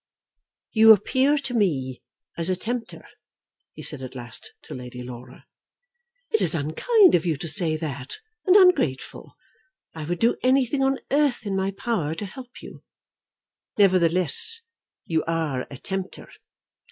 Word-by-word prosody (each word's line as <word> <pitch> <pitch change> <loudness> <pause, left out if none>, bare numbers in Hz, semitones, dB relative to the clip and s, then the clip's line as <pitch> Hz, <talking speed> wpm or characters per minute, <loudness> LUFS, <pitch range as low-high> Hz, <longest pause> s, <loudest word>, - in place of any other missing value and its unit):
"You 220 0 +8
appear 260 +8 +1
to 270 -3 -4
me 140 - -1 0.3
as 170 +1 -3
a 185 - +1
tempter," 230 +4 -5 0.7
he - - -10
said 145 -4 -2
at 130 0 -8
last 120 -2 -9
to - - -10
Lady 125 -1 -8
Laura. 125 0 -11 0.9
"It 440 - +2
is - - +4
unkind 360 - +3
of 165 - +3
you 165 -4 -1
to 165 - -6
say 155 0 +3
that, 140 -4 -6 0.3
and 370 - +5
ungrateful. 360 - +2 0.6
I 160 -2 -7
would 175 +3 -2
do 230 +7 +1
anything 265 +1 +2
on 270 0 +1
earth 280 -5 +1
in 200 -2 -2
my 190 0 0
power 195 -6 -3
to 205 - -5
help 250 +5 -12
you." - - -12 0.9
"Nevertheless 185 - +2 0.4
you 160 -2 -1
are 160 -6 -2
a 140 - -9
tempter." 190 +5 -6
185 Hz, 145 wpm, -24 LUFS, 150-250 Hz, 0.9 s, You